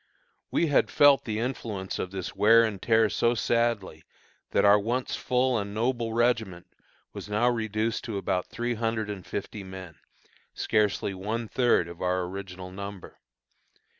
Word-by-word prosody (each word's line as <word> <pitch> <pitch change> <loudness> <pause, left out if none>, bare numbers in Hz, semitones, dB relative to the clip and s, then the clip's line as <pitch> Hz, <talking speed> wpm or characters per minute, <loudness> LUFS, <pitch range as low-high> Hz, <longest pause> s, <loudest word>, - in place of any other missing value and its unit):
We - - +1
had 145 -3 +2
felt 145 -3 +5
the 110 -2 -2
influence 110 -5 -4
of 90 - -3
this 95 -1 -6
wear 115 +2 +6
and 105 -4 -2
tear 110 -1 +4
so 120 +3 +1
sadly, 115 -9 0 0.5
that - - +2
our 100 +1 +7
once 120 +5 -2
full 125 -1 +1
and 100 0 -5
noble 120 0 0
regiment 110 -6 0 0.5
was - - -8
now 105 +4 +2
reduced 110 -1 -2
to 110 -4 -4
about 95 -2 -1
three 120 +1 -2
hundred 110 -2 -2
and 95 -3 -7
fifty 100 +2 -6
men, 95 -3 -10 0.6
scarcely 105 -2 0
one 110 +5 -3
third 120 -8 +2
of 85 0 -10
our 90 0 +1
original 90 0 -7
number. 100 0 -8
110 Hz, 155 wpm, -27 LUFS, 95-115 Hz, 0.6 s, our